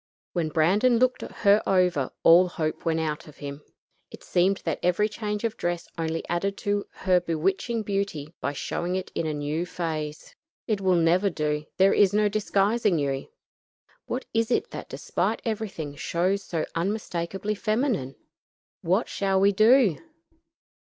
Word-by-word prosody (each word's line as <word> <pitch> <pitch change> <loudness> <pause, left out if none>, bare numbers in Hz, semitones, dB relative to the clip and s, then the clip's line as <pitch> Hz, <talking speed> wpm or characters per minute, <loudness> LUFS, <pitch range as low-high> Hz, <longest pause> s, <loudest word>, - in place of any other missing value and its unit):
When 170 -3 0
Brandon 195 +11 +3
looked 255 +1 +2
her 205 0 +2
over, 180 -8 +2
all 175 +2 +7
hope 155 -3 -3
went 165 -1 +1
out 155 -1 -3
of 150 - -14
him. 140 0 -7 0.5
It - - -12
seemed 190 +2 +1
that - - -1
every 180 +4 +2
change 210 0 -4
of 225 -1 -2
dress 175 -1 -2
only 165 -1 -3
added 195 +3 -1
to 205 0 0
her 185 -1 +2
bewitching 190 +7 -1
beauty 195 -7 -3
by 145 - -1
showing 175 +5 -3
it 185 0 -4
in 165 - -2
a 155 - -1
new 150 +3 -2
phase. 155 -4 -5 0.3
"It 215 -4 -1
will 185 -1 +3
never 175 +4 +3
do; 150 -3 -2
there 190 +1 +5
is 200 -1 +4
no 210 0 +3
disguising 205 -1 +1
you. 140 -2 -2 0.8
What 250 +2 -3
is 225 0 +1
it - - 0
that - - -7
despite - - -1
everything 200 -10 -4
shows 185 +6 0
so 165 -4 -2
unmistakably 195 +1 -2
feminine? 215 - -1 0.7
What 185 +7 +1
shall 195 -1 0
we 200 +1 +5
do? 215 - +5
185 Hz, 155 wpm, -26 LUFS, 160-210 Hz, 0.8 s, all